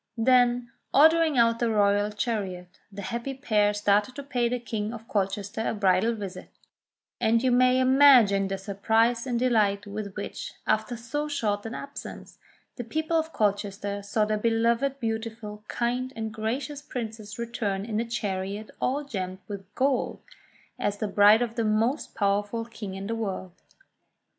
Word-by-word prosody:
Then, 245 0 +3 0.2
ordering 315 0 +5
out 230 -1 +4
the 235 - +1
royal 205 -1 +3
chariot, 195 -5 -4
the 200 0 -7
happy 235 +6 -4
pair 210 -6 +2
started 205 +3 +1
to 280 - -6
pay 245 -4 0
the 250 - 0
King 220 -2 -4
of 225 0 -11
Colchester 200 +1 -2
a - - -1
bridal 200 +3 +2
visit: 195 -3 -7 0.7
and 230 0 +2
you 255 - +3
may 255 +1 +4
imagine 255 -7 +6
the 195 0 -3
surprise 225 +5 +1
and 245 -2 0
delight 215 -5 +2
with 205 -1 -6
which, - - -6
after 220 +3 0
so 295 +6 -3
short 215 -7 -1
an 230 - -6
absence, 280 0 -9 0.4
the 245 - -3
people 315 +7 -2
of 320 0 +1
Colchester 205 -2 -1
saw 205 +2 0
their 215 0 -1
beloved, 235 +5 +1
beautiful, 220 -2 -4
kind, 250 +2 -1
and 220 -1 -4
gracious 255 +7 -3
princess 220 -7 -6
return 215 -4 -2
in 215 -1 -2
a 230 - -1
chariot 205 -2 -3
all 275 +3 0
gemmed 190 -8 -4
with 200 -2 -7
gold, 270 -1 0 0.6
as 205 0 -1
the 215 - -2
bride 205 +3 +6
of 235 -2 -4
the 230 - -1
most 225 +6 0
powerful 205 +3 0
King 220 -4 -7
in 195 +1 -6
the 225 - -2
world. 195 -5 -4
225 Hz, 160 wpm, -27 LUFS, 205-245 Hz, 0.7 s, imagine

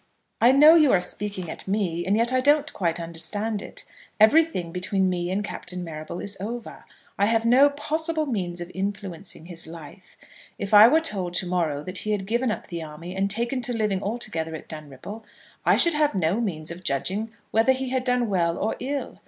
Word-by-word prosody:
I 240 +2 +7
know 300 +4 +8
you 310 -5 +5
are 185 - +5
speaking 185 0 -3
at - - -7
me, 185 -4 -1
and 200 +2 +2
yet 235 +3 +2
I 255 - +3
don't 290 +2 +3
quite 170 -3 -1
understand 200 +6 -2
it. - - -9 0.3
Everything 220 - +4
between 185 +1 0
me 175 -1 -2
and 195 +3 -1
Captain 180 -3 -5
Marrable 155 0 -7
is 200 0 -5
over. 230 +4 -7 0.3
I 200 - +4
have 225 0 +1
no 260 +5 +6
possible 315 +2 -1
means 180 -9 -3
of 175 +1 -7
influencing 190 -4 -5
his 170 -2 -2
life. 165 +3 -12 0.4
If 200 +1 -5
I 210 +2 +10
were 315 +6 +4
told 190 - -1
to 185 - 0
morrow 165 -5 -1
that 185 +2 -3
he 215 - -1
had 195 -2 -2
given 235 +4 0
up 215 - -3
the 170 -1 -6
army 160 +4 -8
and 195 +1 0
taken 235 +5 0
to 245 - -1
living 210 -3 0
altogether 165 -7 -3
at 155 - -10
Dunripple, 155 - -9 0.4
I - - +6
should 340 - +4
have 300 -6 +1
no 185 +5 +1
means 165 -7 -3
of 175 +2 -9
judging 190 +10 -1 0.2
whether 225 +4 +4
he 260 0 -2
had 260 0 -1
done 250 -2 +1
well 170 -4 0
or 215 - -1
ill. 275 +3 -4
200 Hz, 200 wpm, -25 LUFS, 175-240 Hz, 0.4 s, I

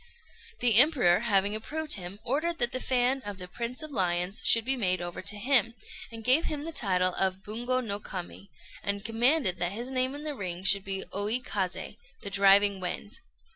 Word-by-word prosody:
The 235 -4 +4
Emperor, 245 - +6
having 205 -2 +1
approved 305 +8 -2
him, 185 0 -3
ordered 320 +7 -1
that 240 0 +2
the 255 - -2
fan 255 +1 0
of 205 -2 -7
the 180 -1 -8
"Prince 235 +8 -5
of 310 - -7
Lions" 180 -3 -1
should 230 -1 +5
be 265 +1 0
made 185 -7 0
over 175 0 -6
to 205 +1 -4
him, 235 0 +3 0.4
and 225 -1 -9
gave 260 +8 +4
him 295 -2 -3
the 330 - -5
title 185 - +1
of 190 0 -1
Bungo 245 +5 -2
no 205 -4 -3
Kami, 190 0 -8 0.3
and 200 0 -3
commanded 230 - +1
that 175 +2 -1
his 240 +5 -4
name 260 +1 0
in 295 - -8
the 305 -1 -3
ring 185 -6 -6
should 195 0 +3
be 195 0 -3
Oi 205 +4 +1
Kazé, 200 -3 -4 0.2
the 200 - -7
"Driving 200 0 +4
Wind." 180 - -5
210 Hz, 195 wpm, -28 LUFS, 190-255 Hz, 0.4 s, Emperor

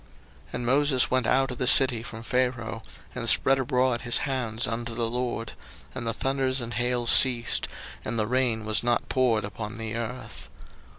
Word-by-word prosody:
02:009:033 - - -23
And 120 - -4
Moses 135 0 +2
went 130 -2 +1
out 135 +1 +2
of 125 - -6
the 125 - 0
city 130 -3 +6
from 115 -1 -9
Pharaoh, 125 -3 -2 0.3
and - - -2
spread 135 0 +3
abroad 125 -2 0
his 120 -1 +2
hands 120 -4 -2
unto 115 0 -4
the 115 -1 0
LORD: 120 -1 -3 0.4
and 120 -3 -6
the - - +1
thunders 135 +1 -1
and 120 -1 -5
hail 120 +1 0
ceased, 120 0 +4 0.4
and 115 - -4
the 110 - 0
rain 120 -2 0
was 110 -1 +2
not 120 0 -1
poured 120 -5 +1
upon 105 +2 -7
the 110 -1 -5
earth. 115 +2 -6
120 Hz, 180 wpm, -26 LUFS, 115-130 Hz, 0.4 s, city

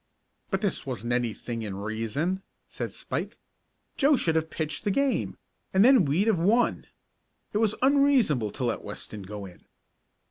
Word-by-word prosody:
"But 195 -1 -1
this 200 -3 -1
wasn't 120 -2 -3
anything 120 -1 -2
in 105 -3 -4
reason," 115 - -2 0.3
said - - -5
Spike. - - -4 0.6
"Joe 285 +1 +5
should 165 - +2
have 160 0 0
pitched 155 -2 -4
the - - 0
game, 275 +6 0 0.4
and 195 +3 +6
then 255 - +6
we'd 155 +9 +2
have 220 -6 +2
won. 220 +8 +2 0.7
It 210 - +1
was 220 -2 +2
unreasonable 265 - +4
to - - -4
let 120 -2 -1
Weston 105 - -7
go 100 +1 -7
in." 90 -2 -13
160 Hz, 155 wpm, -27 LUFS, -, 0.7 s, and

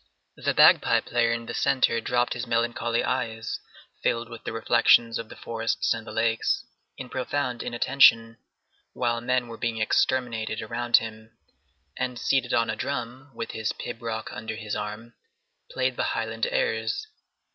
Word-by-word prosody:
The - - -1
bagpipe - - +6
player 115 -1 +1
in 115 0 -2
the 120 - -6
centre 120 -3 +2
dropped 120 +1 +1
his 120 - -5
melancholy 120 0 0
eyes, 115 -4 -2 0.4
filled 115 0 0
with 115 -1 -10
the - - -3
reflections 115 0 +4
of 115 -1 -7
the - - -10
forests 115 0 -1
and 115 0 -7
the - - -6
lakes, 115 +1 0 0.3
in 130 - -7
profound 125 -1 -2
inattention, 115 -2 +4 0.5
while 120 -1 -1
men 125 0 0
were 115 - -9
being 115 -2 -1
exterminated 115 -1 0
around 120 +2 +2
him, 110 0 -7 0.6
and 125 -1 -3
seated 130 +1 +1
on 115 - +2
a 110 - -2
drum, 130 +2 -4
with 115 - -5
his 110 -2 -2
pibroch 115 -2 -5
under 110 0 -5
his 110 -2 -4
arm, 105 +3 -6 0.6
played - - -1
the - - +1
Highland - - -1
airs. - - -1
115 Hz, 155 wpm, -26 LUFS, 115-125 Hz, 0.6 s, bagpipe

